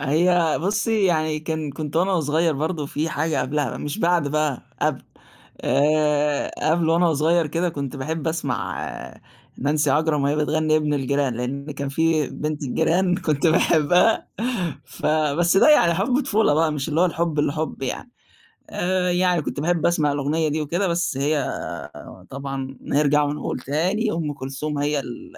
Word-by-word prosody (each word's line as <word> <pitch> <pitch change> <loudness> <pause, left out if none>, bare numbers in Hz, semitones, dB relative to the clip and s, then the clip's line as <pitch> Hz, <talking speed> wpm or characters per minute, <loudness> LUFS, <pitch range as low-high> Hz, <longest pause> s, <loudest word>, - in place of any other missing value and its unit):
هي 165 +3 +2
بُصي 205 +3 +1
يعني 155 -4 +1
كان 155 -1 -3
كنت 150 +1 -5
وأنا 185 +3 +2
وصغير 160 -1 +1
برضه، 155 +1 -2
في 150 +3 -2
حاجة 160 0 -1
قبلها، 145 -2 -1
مش 145 0 -5
بعد 170 -4 +2
بقى، 150 -3 -1 0.2
قبل، - - 0 0.6
آآ، 150 0 +2 0.2
قبل 165 -1 +1
وأنا 170 +1 +3
وصغير 160 +2 +2
كده، 170 +4 -1
كنت 140 -5 -5
باحب 160 +4 -3
أسمع 160 0 -3 0.7
نانسي 150 +1 +1
عجرم 150 +1 +2
وهي 140 +2 +1
بتغني 155 +1 +1
ابن 150 -1 0
الجيران، 140 -1 0
لأن 140 +5 -4
كان 140 -1 -4
في 160 +1 +1
بنت 150 0 -4
الجيران 170 +6 +1
كنت 155 -2 0
باحبها 170 +5 +3 0.6
فبس 155 +6 +1
ده 200 - +6
يعني 170 - +5
حُب 240 - +1
طفولة 220 - +2
بقى، 160 0 +2
مش 145 0 -3
اللي 155 +2 0
هو - - +5
الحُب 165 -2 -2
الحُب 155 0 -1
يعني. 185 - -4 0.6
آآ، 180 0 0
يعني 180 -2 +2
كنت 145 - -4
باحب 170 0 +1
أسمع 155 -4 +2
الأغنية 150 +3 0
دي 155 +1 -1
وكده، 175 +6 -1
بس 170 -4 -1
هي 145 +1 0 0.9
طبعًا 135 -1 -5
نرجع 150 0 +2
ونقول 145 -2 -3
تاني 185 - 0
أم 160 -3 -2
كلثوم 140 +2 -5
هي 145 0 0
ال 310 - -9
155 Hz, 155 wpm, -22 LUFS, 145-170 Hz, 0.9 s, ده